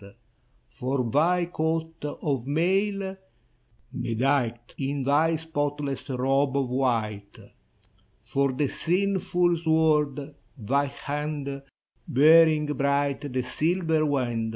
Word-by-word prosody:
For 125 - -2
thy 175 +5 +2
coat 160 -1 -3
of 140 -3 -3
mail, 190 +5 0 0.8
bedight 120 -1 -1
In 140 0 -2
thy 155 +4 +3
spotless 145 -4 -3
robe 135 +2 +1
of 135 -3 -1
white. 110 -6 -1 0.9
For 135 +4 0
the 135 +2 0
sinful 180 0 +1
sword, 155 -3 +1
— - - -38
thy 135 +5 0
hand 145 0 -4 0.5
Bearing 155 +2 +5
bright 140 0 -1
the 130 0 -1
silver 160 +4 0
wand. 120 -6 -1
145 Hz, 100 wpm, -26 LUFS, 135-160 Hz, 0.9 s, Bearing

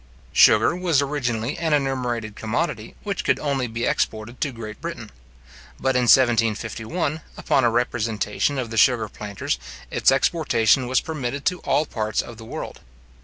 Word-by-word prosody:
Sugar - - +6
was 175 -5 +1
originally 130 -4 -2
an 160 -2 0
enumerated 125 -6 -1
commodity, 115 +12 -3
which 200 -3 -3
could - - +2
only 140 -4 -1
be 115 +1 -3
exported 110 +3 -2
to 145 - 0
Great 110 -1 -9
Britain; 165 -10 -6 0.7
but 130 -1 0
in 125 -1 +3
1751, 120 - +2 0.2
upon 135 - +1
a 120 - +4
representation 115 +2 -1
of 120 -3 -3
the 115 - -4
sugar 115 0 +4
planters, 100 - -4 0.3
its - - +3
exportation 135 - +2
was 130 - +2
permitted 140 -3 -4
to 180 0 +1
all 155 - +1
parts 110 -5 -2
of 120 - -11
the 110 - -11
world. - - -7
125 Hz, 155 wpm, -23 LUFS, 110-145 Hz, 0.7 s, Sugar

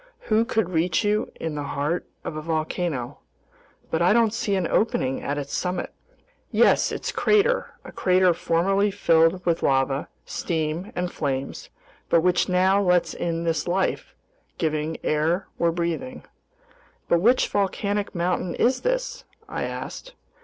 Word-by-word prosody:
Who 220 +2 +4
could 220 -6 0
reach 165 0 +1
you 210 +1 0
in 160 -1 -4
the 150 - -3
heart 145 +4 -2 0.2
of 155 - -5
a 155 - -4
volcano? 155 -4 -2 0.7
But 160 - +1
don't 180 +6 +4 0.2
I - - -3
see 205 -3 0
an 185 -2 0
opening 165 - 0
at 145 +1 -2
its 140 -1 -4
summit?" 180 -1 -2 0.6
"Yes, - - +3
its - - -3
crater, 435 +4 +2
a - - -9
crater 185 -1 +3
formerly 180 +4 +1
filled 170 -2 +3
with 170 -1 +1
lava, 135 +1 +1 0.2
steam, 160 +3 -3
and 180 0 -2
flames, 135 -2 -3 0.4
but 170 - +4
which 180 +2 +2
now 190 +2 +3
lets 180 -2 +2
in 165 -1 -2
this 165 0 -1
life 185 +2 -1 0.4
giving 155 0 -1
air 160 +5 +1
we're 170 - +3
breathing." 170 +10 -3 0.8
"But 170 - +3
which 245 +6 +4
volcanic 205 0 -1
mountain 175 0 -1
is 255 +1 +2
this?" - - -2 0.2
I - - -3
asked. - - -7
175 Hz, 145 wpm, -24 LUFS, 160-200 Hz, 0.8 s, Who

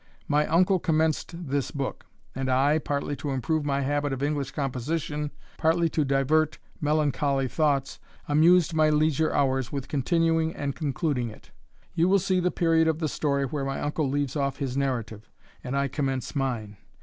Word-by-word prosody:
My 150 +1 +2
uncle 185 +4 +3
commenced 160 0 0
this 140 0 -1
book; 140 -2 -5 0.3
and 135 0 -3
I, 140 +4 +3
partly 145 -1 -2
to 145 - -4
improve 145 +4 0
my 140 -1 0
habit 145 +1 0
of 135 +1 -3
English 145 -2 -1
composition, 145 +2 -2 0.3
partly 165 +1 +2
to 155 0 +1
divert 145 +3 +2 0.2
melancholy 145 -3 +1
thoughts, 140 0 0 0.3
amused 165 +3 +4
my 155 -1 +4
leisure 155 0 +2
hours 135 -2 +1
with 135 -2 -4
continuing 165 +3 +1
and 140 -2 -3
concluding 140 -4 -1
it. 110 - -15 0.4
You 170 +1 +2
will 200 - +5
see 185 -1 +1
the 180 0 +2
period 165 -2 +2
of 160 -1 +1
the 160 -1 -1
story 140 -2 0
where 140 +1 -3
my 135 0 -2
uncle 150 -1 -1
leaves 140 0 -1
off 140 -2 -1
his 135 -3 -3
narrative, 115 -6 -2 0.3
and 130 +2 -2
I 140 0 +1
commence 135 0 -3
mine. 120 -7 -2
145 Hz, 170 wpm, -26 LUFS, 135-155 Hz, 0.4 s, will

